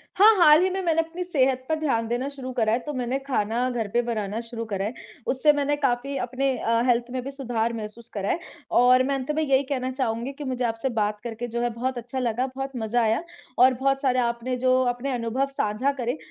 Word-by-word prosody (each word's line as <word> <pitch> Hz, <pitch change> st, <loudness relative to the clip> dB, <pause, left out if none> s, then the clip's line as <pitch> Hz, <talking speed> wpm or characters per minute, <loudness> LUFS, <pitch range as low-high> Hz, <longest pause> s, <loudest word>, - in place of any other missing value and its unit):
हाँ, 430 Hz, +3 st, +7 dB
हाल 310 Hz, -1 st, +7 dB
ही 375 Hz, -, +2 dB
में 380 Hz, +1 st, -2 dB
मैंने 330 Hz, -2 st, +2 dB
अपनी 335 Hz, +2 st, -5 dB
सेहत 265 Hz, -6 st, +1 dB
पर 315 Hz, -, +2 dB
ध्यान 230 Hz, -7 st, 0 dB
देना 245 Hz, +3 st, -1 dB
शुरू 265 Hz, -2 st, -7 dB
करा 220 Hz, -2 st, +2 dB
है 235 Hz, -, +2 dB
तो 295 Hz, +4 st, -6 dB
मैंने 250 Hz, 0 st, -1 dB
खाना 250 Hz, -2 st, -1 dB
घर 230 Hz, -4 st, -2 dB
पे 240 Hz, -, +3 dB
बनाना 220 Hz, -3 st, -3 dB
शुरू 230 Hz, 0 st, -6 dB
करा 200 Hz, -2 st, -2 dB
है 225 Hz, -, -3 dB, 0.3 s
उससे 270 Hz, +4 st, +4 dB
मैंने 290 Hz, 0 st, +1 dB
काफ़ी 275 Hz, 0 st, 0 dB
अपने 260 Hz, +3 st, -1 dB
अ, 230 Hz, +1 st, +1 dB
हेल्थ 240 Hz, 0 st, +2 dB
में 255 Hz, -1 st, -2 dB
भी 275 Hz, -, -5 dB
सुधार 235 Hz, -4 st, -2 dB
महसूस 225 Hz, +1 st, -7 dB
करा 200 Hz, -1 st, -2 dB
है। -, -, +1 dB, 0.4 s
और 250 Hz, +1 st, +6 dB
मैं 275 Hz, +1 st, 0 dB
अंत 270 Hz, +2 st, -2 dB
में 315 Hz, -, +1 dB
यही 275 Hz, -1 st, +3 dB
कहना 260 Hz, -2 st, -2 dB
चाहूँगी 250 Hz, -1 st, -2 dB
कि 290 Hz, -, -8 dB
मुझे 255 Hz, -2 st, -2 dB
आपसे 225 Hz, +3 st, -1 dB
बात 210 Hz, 0 st, 0 dB
करके 235 Hz, +1 st, -5 dB
जो 235 Hz, +1 st, -3 dB
है 240 Hz, -, +1 dB
बहुत 255 Hz, +2 st, -2 dB
अच्छा 245 Hz, +2 st, -4 dB
लगा, 245 Hz, +1 st, 0 dB
बहुत 270 Hz, 0 st, -4 dB
मज़ा 235 Hz, +1 st, 0 dB
आया। 225 Hz, +8 st, +1 dB, 0.3 s
और 255 Hz, +1 st, +6 dB
बहुत 270 Hz, +2 st, 0 dB
सारे 255 Hz, -2 st, +2 dB
आपने 235 Hz, +1 st, -1 dB
जो 255 Hz, +1 st, +3 dB
अपने 265 Hz, +3 st, -4 dB
अनुभव 245 Hz, +3 st, -1 dB
साझा 250 Hz, +2 st, +1 dB
करे 245 Hz, +4 st, -1 dB
255 Hz, 230 wpm, -25 LUFS, 230-275 Hz, 0.4 s, हाँ